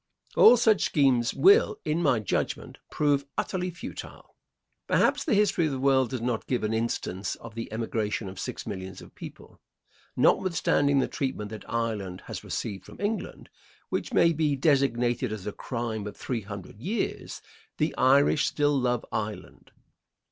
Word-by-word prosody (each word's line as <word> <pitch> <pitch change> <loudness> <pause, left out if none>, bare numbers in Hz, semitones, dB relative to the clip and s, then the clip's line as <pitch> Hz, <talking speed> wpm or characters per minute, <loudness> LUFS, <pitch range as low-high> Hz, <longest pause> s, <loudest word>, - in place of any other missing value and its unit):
All 245 - +8
such 220 -3 +3
schemes 130 -6 +3
will, 425 +2 +5
in 155 +2 0
my 140 -7 +3
judgment, 105 - -3
prove 145 -2 +1
utterly 185 -1 -1
futile. 175 - -9 0.5
Perhaps - - +2
the 270 - +1
history 200 -5 +3
of - - -2
the 135 - -3
world 130 -2 +3
does 125 -1 -4
not 120 -2 -2
give 125 -3 -1
an 110 +1 0
instance 110 -4 -2
of 115 -1 -11
the 115 +1 -6
emigration 110 -2 -2
of 95 0 -8
six - - -5
millions 95 -1 -6
of - - -15
people. - - -12 0.5
Notwithstanding 145 -6 +2
the 135 - +2
treatment 120 -6 -3
that 110 - -9
Ireland 105 -6 -2
has - - -7
received 95 -2 -4
from - - -14
England, 205 +2 -3 0.4
which - - -2
may 170 - +4
be 150 -2 +1
designated 125 -4 +1
as 110 -3 -6
a 105 - -2
crime 115 -3 -4
of 105 - -8
three 120 -3 -3
hundred 100 0 -9
years, 210 - -3 0.4
the 155 +1 0
Irish 140 +3 +4
still 145 -1 +1
love 125 -3 0
Ireland. 105 -4 -5
125 Hz, 160 wpm, -27 LUFS, 110-150 Hz, 0.5 s, All